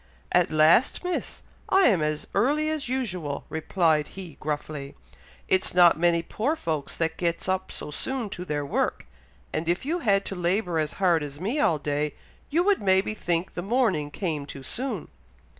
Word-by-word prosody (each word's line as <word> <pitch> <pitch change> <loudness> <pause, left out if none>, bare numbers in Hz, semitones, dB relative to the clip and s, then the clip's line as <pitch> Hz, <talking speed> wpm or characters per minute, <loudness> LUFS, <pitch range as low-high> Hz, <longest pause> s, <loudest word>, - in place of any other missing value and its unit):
"At 180 -1 +4
last, 155 - +4
Miss!! 360 0 -3 0.3
I 385 - +5
am 200 - +4
as 150 0 -1
early 295 +9 +2
as 305 -5 -3
usual!" 185 - -2
replied 160 -1 +1
he, 180 -6 -9
gruffly. 150 -2 -4 0.5
"It's 185 -1 +2
not 175 -3 +7
many 170 -1 +3
poor 250 - -1
folks 155 - -3
that 165 -1 -1
gets 170 0 -1
up 190 0 -1
so - - -4
soon 245 - -3
to 180 - -5
their 150 -4 -2
work, 140 - -1 0.5
and 160 +2 -2
if 175 +8 0
you 335 +5 0
had 200 - +2
to 195 - -4
labour 180 -1 0
as 155 -1 -1
hard 175 -4 +2
as 145 -1 -6
me 220 - -1
all 165 - +3
day, 150 0 -2 0.3
you 330 +4 +2
would 405 0 +2
maybe 190 +1 +2
think 175 -3 -1
the 175 - -4
morning 195 - +1
came 150 -3 -3
too 140 -1 -8
soon." 240 - -3
175 Hz, 175 wpm, -26 LUFS, 155-215 Hz, 0.5 s, not